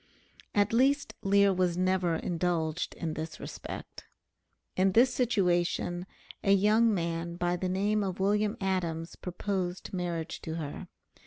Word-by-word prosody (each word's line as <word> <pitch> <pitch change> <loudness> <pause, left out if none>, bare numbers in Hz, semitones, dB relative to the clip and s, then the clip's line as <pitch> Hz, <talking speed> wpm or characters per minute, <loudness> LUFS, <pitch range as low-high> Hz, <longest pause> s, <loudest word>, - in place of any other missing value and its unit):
At 205 +1 +3
least 275 +4 +3
Lear 200 0 +4
was 180 -2 +1
never 185 -2 +2
indulged 170 -1 -1
in 160 -2 -3
this 160 +1 -5
respect. - - -8 0.7
In 190 0 +3
this 245 +3 +5
situation 180 -6 +1 0.4
a 195 - +5
young 215 +4 +4
man 170 -2 -2
by 175 0 0
the 180 +1 -2
name 205 +3 +1
of 190 -2 -3
William 205 +2 +1
Adams 170 -4 -2
proposed 180 0 -3
marriage 175 -3 -3
to 160 -1 -4
her. 150 -3 -5
185 Hz, 135 wpm, -30 LUFS, 170-200 Hz, 0.7 s, this